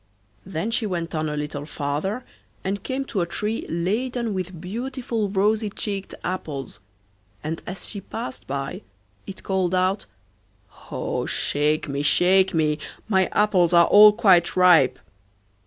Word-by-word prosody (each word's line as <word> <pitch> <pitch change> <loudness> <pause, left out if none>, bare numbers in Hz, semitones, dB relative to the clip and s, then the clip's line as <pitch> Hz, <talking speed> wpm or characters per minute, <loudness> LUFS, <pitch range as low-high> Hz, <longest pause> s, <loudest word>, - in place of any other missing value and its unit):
Then 190 +4 -3
she 225 -1 0
went 170 -3 -3
on 155 -1 -1
a 150 - -3
little 150 0 -4
farther 155 - -3 0.4
and 195 +1 -2
came 270 +1 -3
to 200 -7 -2
a 170 - -1
tree 210 +6 -3
laden 225 +7 -1
with 185 -2 -4
beautiful 235 +3 -3
rosy 210 +2 +1
cheeked 200 -2 -4
apples, 150 -8 -4 0.6
and 160 +2 -4
as 180 +1 -6
she 200 - -6
passed 130 -7 -7
by 135 0 -4 0.5
it 190 - -8
called 185 -2 0
out: 185 +2 +1 0.8
'Oh - - -2
I - - -6
shake 150 +1 0
me, 140 0 -2
shake 185 +5 +4
me, 155 -2 +1 0.3
my 190 -4 +3
apples 185 -5 +2
are 170 0 +7
all 210 +1 +9
quite 190 -5 +4
ripe. 165 -9 +5
185 Hz, 145 wpm, -23 LUFS, 160-210 Hz, 0.8 s, all